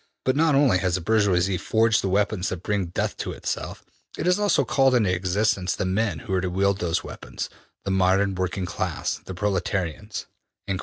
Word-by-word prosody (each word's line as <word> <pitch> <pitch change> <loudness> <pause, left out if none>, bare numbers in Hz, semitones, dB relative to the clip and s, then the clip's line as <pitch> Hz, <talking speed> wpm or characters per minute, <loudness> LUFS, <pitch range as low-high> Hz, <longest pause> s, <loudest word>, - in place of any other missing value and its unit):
But 130 - +2
not 155 -1 +3
only 135 -10 +4
has 90 -2 0
the 95 - -2
bourgoisie 95 -2 +2
forged 110 0 +2
the 95 - -1
weapons 100 -1 +1
that 90 -1 -5
bring 100 -4 0
death 85 - -2
to - - -4
itself; - - -5 0.3
it 150 - -3
has 180 +2 +3
also 205 -9 +2
called 135 -1 +3
into 105 -7 +3
existence 95 +1 0
the - - -2
men 95 -1 0
who 100 - -3
are 95 - +2
to 90 - -1
wield 100 +2 +1
those 85 -1 0
weapons - - -7 0.3
the 95 - -1
modern 95 +1 +3
working 95 0 -2
class 85 -1 -3
the 95 - -7
proletarians.'' 95 0 -2
95 Hz, 190 wpm, -24 LUFS, 90-110 Hz, 0.3 s, only